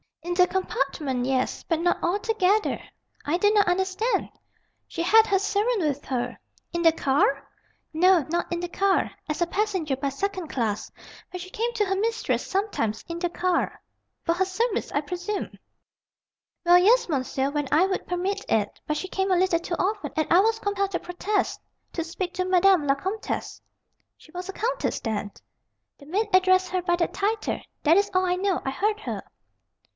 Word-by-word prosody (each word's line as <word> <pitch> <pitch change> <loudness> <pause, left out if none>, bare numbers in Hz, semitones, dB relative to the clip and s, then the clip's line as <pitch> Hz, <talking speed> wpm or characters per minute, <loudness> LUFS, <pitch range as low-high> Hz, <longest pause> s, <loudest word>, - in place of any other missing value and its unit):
"In 350 +1 -2
the 360 0 +5
compartment, 275 -8 -1
yes. 260 -1 0
But 330 -1 -1
not 350 0 +1
altogether." 415 +2 +1 0.4
"I 305 +4 0
do 410 +3 +3
not 415 -1 +4
understand!" 380 +6 0 0.6
"She 335 - -3
had 445 +5 +6
her 400 - +3
servant 415 +3 +1
with 290 -3 -1
her." 245 -1 -3 0.3
"In 340 - -1
the 330 -1 +6
car?" 275 -2 +1 0.5
"No, 350 -1 +4
not 345 +2 -1
in 345 - -1
the 350 - -2
car. 390 +2 +1 0.2
As 305 - -2
a - - -2
passenger 375 -7 -1
by 275 +1 -2
second 375 +4 -3
class. 225 -7 -2 0.4
But 365 - -6
she 370 +1 -9
came 465 +3 -1
to 430 -3 +1
her 385 0 0
mistress 450 +3 -1
sometimes, 380 - -1
in 335 0 -4
the 350 0 0
car." 350 0 -1 0.4
"For 335 - +2
her 375 +2 +1
service, 420 +4 -1
I 290 - +1
presume?" 360 +6 -4 1.1
"Well, 350 +1 +7
yes, 465 +7 +4
monsieur, 270 -2 -1
when 290 -1 -1
I 325 +5 +5
would 380 0 -2
permit 380 +3 -2
it. 210 -2 0
But 300 - 0
she 375 - -4
came 385 +1 -1
a 365 - +4
little 360 -2 +2
too 345 0 -3
often, 405 +2 -1
and 310 -1 0
I 350 - +7
was 445 +3 +3
compelled 400 -1 -1
to 350 - -1
protest, 375 +3 -2 0.3
to 330 - -2
speak 350 +2 -4
to 365 - 0
Madame 370 -3 +4
la 275 - +4
Comtesse 380 +9 -4 0.3
" - - -48
"She 310 - -19
was 360 +2 -6
a - - -4
countess, - - -1
then?" 210 -3 -3 0.7
"The 280 - -15
maid 410 +7 0
addressed 370 0 +4
her 370 -1 -1
by 350 0 +1
that 345 -1 -1
title. 425 +3 -1 0.2
That 325 +3 +5
is 405 0 +3
all 370 0 +3
I 360 0 +1
know. 380 0 0
I 270 - 0
heard 420 +9 0
her." - - -4
365 Hz, 190 wpm, -25 LUFS, 320-395 Hz, 1.1 s, Well